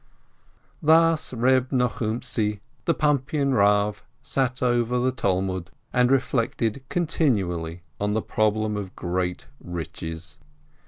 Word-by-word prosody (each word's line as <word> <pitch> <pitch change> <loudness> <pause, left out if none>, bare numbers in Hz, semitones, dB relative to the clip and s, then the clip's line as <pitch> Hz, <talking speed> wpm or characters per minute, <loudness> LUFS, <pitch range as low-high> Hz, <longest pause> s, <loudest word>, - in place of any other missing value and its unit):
Thus 160 +1 +4
Eeb 130 +1 +2
Nochumtzi, 115 -3 -1 0.3
the 170 - +2
Pumpian 140 -1 +1
Rav, 105 0 +3 0.2
sat 130 -1 0
over 120 0 +2
the 125 +1 +2
Talmud 95 -5 -1 0.2
and 125 0 +4
reflected 125 -2 +1
continually 95 - 0 0.2
on 105 +1 0
the 110 - +1
problem 110 0 +1
of 95 -2 -6
great 90 0 -2 0.2
riches. 80 -1 -6
115 Hz, 105 wpm, -25 LUFS, 95-130 Hz, 0.3 s, Thus